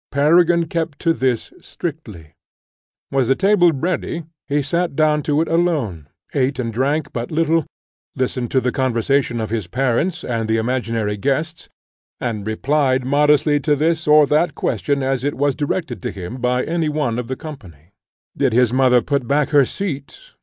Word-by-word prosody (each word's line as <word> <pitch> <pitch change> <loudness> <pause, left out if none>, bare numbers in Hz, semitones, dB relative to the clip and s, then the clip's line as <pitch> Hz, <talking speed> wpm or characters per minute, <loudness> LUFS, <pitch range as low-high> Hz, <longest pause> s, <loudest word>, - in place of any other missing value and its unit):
Peregrine 170 +4 +4
kept 160 -2 -3
to 165 -2 +1
this 130 -6 -1
strictly. 110 - -7 0.8
Was 135 -3 +1
the 135 - +3
table 190 -1 +4
ready? 165 +2 -2 0.2
He 145 0 0
sat 170 +2 -1
down 150 0 +2
to 150 +1 +1
it - - -7
alone, 145 - -1 0.2
ate 135 -1 0
and 115 -3 -3
drank 140 +5 -1
but 120 0 -4
little, 165 0 +1 0.5
listened 125 -2 -2
to 130 - +2
the 125 - 0
conversation 130 -1 0
of 110 -1 -3
his 110 -6 -2
parents, 135 - 0
and 115 -2 -2
the 110 - +2
imaginary 115 -3 -1
guests, 150 +8 -2 0.5
and 110 -4 -3
replied 130 +3 +1
modestly 145 +1 +3
to 150 +1 +1
this 160 +2 0
or 150 0 +7
that 155 +5 +1
question 140 -2 -1
as 130 -1 -1
it 145 +1 -1
was 145 0 +1
directed 145 - -3
to - - -3
him 95 +6 -7
by 125 +1 +1
any 165 -2 -1
one 145 -6 -1
of 125 - -5
the 130 - -3
company. 95 - -11 0.4
Did - - +1
his 125 0 +3
mother 125 -2 +4
put 140 -3 -1
back 145 +2 +1
her 145 -3 +5
seat? 145 -9 -5
140 Hz, 170 wpm, -20 LUFS, 120-155 Hz, 0.8 s, or